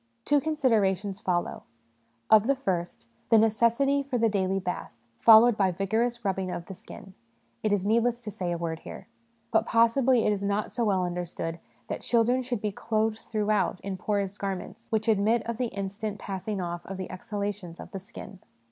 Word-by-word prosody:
Two 290 -1 +3
con 315 +1 -1
siderations 205 -7 +1
follow: 175 -2 -1 0.7
of 220 +1 +7
the 275 - +3
first, 175 - -3 0.2
the 225 - +6
necessity 235 +6 +3
for 275 -2 -2
the 225 -1 +3
daily 195 -2 0
bath, 180 -1 -4 0.3
followed 230 +1 +8
by 195 -2 +2
vigorous 225 +6 -1
rubbing 190 -1 -1
of 175 -1 -5
the 190 - -8
skin, 190 +1 -12 0.5
it 215 - 0
is 200 -2 +1
needless 235 +3 +2
to 215 - -6
say 180 -2 -3
a 170 - -1
word 165 -1 -3
here. - - -10 0.5
But 220 0 +2
possibly 235 +2 +4
it 210 - +3
is 200 - -3
not 200 +1 -1
so 235 - -1
well 190 -3 +2
understood 175 -1 -4 0.3
that - - -4
children 240 +2 +2
should 245 -4 -3
be 210 - -1
clothed 220 +1 -1
throughout 210 -4 0
in 195 -1 -4
porous 200 +1 -2
garments 195 -2 -5
which 220 0 0
admit 220 +2 +3
of 235 -1 -3
the 250 0 0
instant 200 +1 -4
passing 195 +1 -4
off 175 -1 -4
of 195 - -5
the 185 - -6
exhalations 200 -3 -5
of - - -10
the 195 - -5
skin. 190 0 -11
205 Hz, 185 wpm, -27 LUFS, 190-230 Hz, 0.7 s, followed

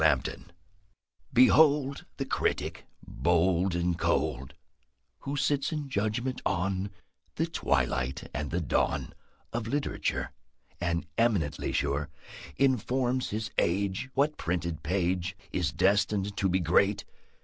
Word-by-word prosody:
LAMPTON 70 -1 +1 0.8
Behold 140 +2 +5
The - - -2
Critic, - - -1 0.2
bold 85 +1 +2
and 85 0 0
cold, 65 -7 0 0.6
Who 140 +1 -4
sits 140 0 +1
in 150 -3 -3
judgment 120 +3 -1
on 95 +1 0 0.5
The - - +1
twilight 65 +1 -1
and 75 - -3
the 85 +4 -1
dawn 80 - 0 0.4
Of 115 -1 -2
literature, 145 +4 -1 0.5
And, 85 -1 -1
eminently 105 -11 +1
sure, 70 +2 0 0.5
Informs 130 -1 +1
his 110 +1 -3
age 95 +7 0
What 145 +3 +2
printed 85 -2 -2
page 90 +1 -1
Is 90 -2 0
destined 100 0 +2
to 95 - +1
be 95 +1 +2
great. 95 +4 +2
95 Hz, 115 wpm, -29 LUFS, 85-125 Hz, 0.8 s, Behold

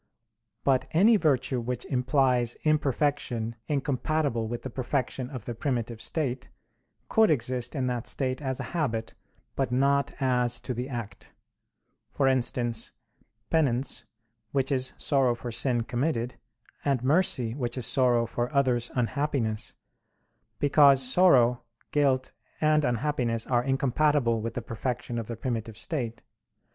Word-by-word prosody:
But 130 -2 +2
any 205 +8 +6
virtue 135 -8 +1
which 125 +1 -4
implies 125 -2 +2
imperfection 140 -6 0
incompatible 140 -3 0
with 120 +1 -5
the 130 - -5
perfection 130 0 -2
of 130 -6 -8
the 120 - -4
primitive 120 -2 -3
state, 135 -6 -2 0.6
could 220 0 +4
exist 125 -3 0
in 135 -3 0
that 125 -2 -2
state 130 0 -1
as 130 -2 -2
a - - -3
habit, 115 -10 -2 0.4
but 135 -3 -1
not 140 +2 +2
as 125 -3 +1
to 130 - -4
the 125 +3 -4
act; 120 -5 -7 0.8
for 135 - +1
instance, 120 -3 0 0.6
penance, 135 -5 +1 0.5
which 135 0 +1
is 130 -1 0
sorrow 135 -4 +2
for 120 +1 -6
sin 120 +1 +2
committed; 125 -1 -1 0.5
and 135 -4 0
mercy, 130 -6 +2
which 120 -2 -3
is 125 - -1
sorrow 125 -3 +3
for 120 +1 -3
others' 125 -4 +2
unhappiness; 125 -3 -1 0.8
because 140 -2 +5
sorrow, 130 -6 +4 0.3
guilt, 135 -3 +2 0.3
and 155 0 +3
unhappiness 120 -3 0
are 120 -1 +1
incompatible 135 -2 +1
with 115 +1 -4
the 120 - -3
perfection 120 +1 -3
of 115 - -5
the 115 - -4
primitive 115 -2 -4
state. 120 -3 -4
130 Hz, 130 wpm, -27 LUFS, 120-140 Hz, 0.8 s, any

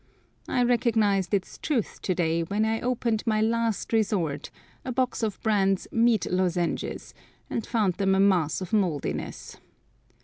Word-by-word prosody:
I 245 - +1
recognised 225 -6 +2
its 195 -2 -2
truth 265 - -2
to 185 - -1
day 165 -1 +1
when 200 +6 0
I 225 0 0
opened 235 -3 0
my 215 -1 +2
last 230 0 0
resort, 180 -10 0 0.3
a 260 - -4
box 255 0 -1
of 215 -3 -2
Brand's 195 -3 +2
meat 230 -1 +3
lozenges, 180 -2 -1 0.4
and 230 - -1
found 215 -6 +1
them 195 -1 +2
a - - +2
mass 185 -5 +2
of 185 +1 -6
mouldiness. 180 -9 -2
210 Hz, 145 wpm, -26 LUFS, 185-230 Hz, 0.4 s, meat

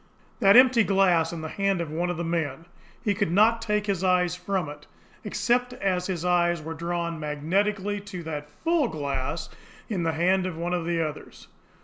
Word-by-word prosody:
That 200 -4 +6
EMPTY 255 -2 +7
glass 180 -5 +3
in 170 -2 -6
the 160 - -4
hand 195 +2 0
of 165 -3 -4
one 175 +3 -1
of 175 - -2
the 170 - -2
men! 165 -2 -2 0.4
He 205 - +2
could 190 - -1
not 220 +5 +4
take 210 -2 0
his 195 -3 -1
eyes 180 -1 +2
from 180 -2 -2
it 145 0 -10 0.4
except 245 +1 0
as 185 -5 -1
his 180 -3 -3
eyes 175 -1 +2
were 160 +1 -6
drawn 170 0 -3
magnetically 195 +7 -1
to 200 -3 -8
that 150 -2 -5
FULL 330 -5 +2
glass 140 - -3 0.4
in 200 -6 -1
the 165 -1 0
hand 185 +3 +2
of 170 -3 -5
one 175 +2 -2
of 175 -2 -1
the 165 -2 +1
others. 150 - -10
175 Hz, 195 wpm, -26 LUFS, 165-200 Hz, 0.4 s, EMPTY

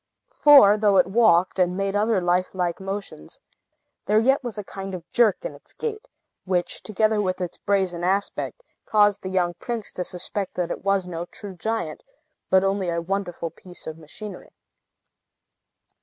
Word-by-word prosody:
For, 275 -9 +7
though 205 -2 +3
it 185 - +6
walked, 190 -3 +3
and 180 0 +2
made 195 0 -1
other 215 0 +2
lifelike 180 0 0
motions, 195 - -6 0.7
there 210 - +3
yet 265 +6 +3
was 240 -3 -5
a 210 - -4
kind 195 0 -6
of 175 -2 -9
jerk 235 - +3
in - - -4
its - - -15
gait, 435 -2 -5 0.4
which, 180 -2 -1
together 215 0 +1
with 185 -2 -1
its 180 -2 -5
brazen 190 -4 0
aspect, 200 - -1 0.2
caused 205 -2 +3
the 185 - -5
young 180 -2 +1
prince 235 -4 -4
to 180 - -3
suspect 185 +2 -4
that 180 -2 -2
it - - -5
was 195 -1 +1
no 170 -1 -5
true 200 +2 -9
giant, 200 -3 -3 0.5
but 190 0 +5
only 195 -2 0
a 170 0 0
wonderful 175 -2 -3
piece 180 +2 -11
of 160 0 -7
machinery. 195 +7 -10
195 Hz, 165 wpm, -24 LUFS, 180-210 Hz, 0.7 s, For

